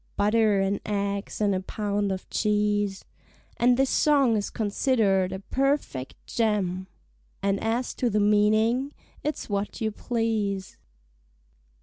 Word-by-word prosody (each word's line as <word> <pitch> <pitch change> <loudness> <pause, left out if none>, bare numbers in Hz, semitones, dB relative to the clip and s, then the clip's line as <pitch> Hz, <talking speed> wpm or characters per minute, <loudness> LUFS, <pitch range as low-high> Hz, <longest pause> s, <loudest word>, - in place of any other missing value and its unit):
(Butter 210 0 +3
and 195 +1 0
eggs 200 -1 -2
and 205 -1 +3
a 185 - 0
pound 205 +1 -2
of 190 -1 -5
cheese) 205 -2 0 0.5
And 245 +1 +4
this 270 0 +2
song 280 -6 +4
is 205 -1 -1
consider'd 205 -4 +1
a 190 - -3
perfect 265 - -1
gem, 195 -5 -1 0.6
And 195 0 +1
as 230 +3 -1
to 245 - +1
the 210 -1 +1
meaning, 215 +6 +3 0.3
it's 300 +1 -3
what 200 0 -3
you 220 -1 -1
please. 210 -4 -2
210 Hz, 125 wpm, -26 LUFS, 200-230 Hz, 0.6 s, And